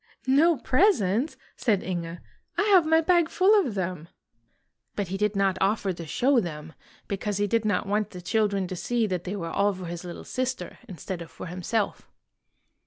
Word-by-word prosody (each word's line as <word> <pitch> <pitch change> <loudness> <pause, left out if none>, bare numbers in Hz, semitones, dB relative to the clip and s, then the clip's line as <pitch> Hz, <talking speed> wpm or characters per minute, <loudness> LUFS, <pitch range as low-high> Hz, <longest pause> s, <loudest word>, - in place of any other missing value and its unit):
" - - -31 0.2
No 335 -1 +4
presents! 260 - +2
" - - -32
said 205 -6 +1
Inge. 170 -2 -4 0.2
" - - -40
I - - +3
have 365 -5 +6
my 320 +1 +5
bag 345 -1 +3
full 380 +4 +4
of 240 - -4
them." 180 -4 -3 0.9
But 200 -4 -2
he 190 - -3
did 210 +1 0
not 195 -1 +1
offer 195 -1 +1
to 170 -1 -8
show 260 - +3
them, 160 -5 -5 0.3
because 200 0 -2
he 205 - +2
did 225 +2 0
not 205 -3 +1
want 210 +1 0
the 180 - -9
children 200 +1 0
to 185 - -4
see 235 +5 0
that 180 -4 -3
they 190 +2 -3
were 170 -4 -4
all 200 +3 +2
for 185 -1 -7
his 175 +1 -6
little 175 -1 -7
sister 255 0 -3
instead 185 -1 -6
of 165 - -8
for - - -9
himself. 185 +5 -2
200 Hz, 200 wpm, -26 LUFS, 180-240 Hz, 0.9 s, have